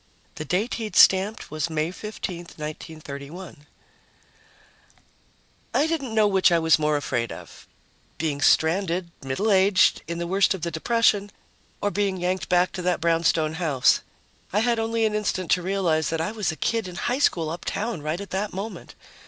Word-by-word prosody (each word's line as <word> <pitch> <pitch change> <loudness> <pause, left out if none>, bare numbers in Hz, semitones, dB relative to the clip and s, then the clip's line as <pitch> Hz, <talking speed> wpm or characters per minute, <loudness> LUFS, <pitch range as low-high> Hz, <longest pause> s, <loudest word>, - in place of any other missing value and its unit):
The 155 - -6
date 195 - -1
he'd 215 -1 -5
stamped 195 +1 +4
was 155 +1 -2
May 160 +1 -1
15, 195 -2 -6 0.2
1931. 150 0 -8 2.1
I 295 - +4
didn't 285 -8 -2
know 215 -1 +5
which 190 -2 +3
I 170 - +4
was 160 -1 +3
more 150 -1 +1
afraid 120 -4 -2
of - - -11 0.5
being 150 -3 -2
stranded, 170 +3 +2
middle 135 +12 -1
aged, 190 0 +4
in 170 0 -4
the 170 - -3
worst 190 +2 +2
of 175 - -9
the 170 - -2
depression, 205 +3 +2 0.5
or 205 - 0
being 200 -2 0
yanked 180 +1 -2
back 180 0 +3
to 185 - -5
that 180 0 0
brownstone 165 -2 +1
house. 155 -7 +2 0.5
I 210 - +2
had 235 0 +1
only 225 0 0
an 215 - 0
instant 200 -4 -2
to 180 - +3
realize 175 -4 0
that 165 - -2
I 165 +6 -1
was 215 -6 -1
a - - -7
kid 225 +4 -1
in 180 - -8
high 245 +9 -1
school 165 - +1
uptown 205 +3 -4
right 155 +4 -3
at 200 - -8
that 200 +2 -2
moment. 200 +4 -7
180 Hz, 170 wpm, -24 LUFS, 160-205 Hz, 2.1 s, know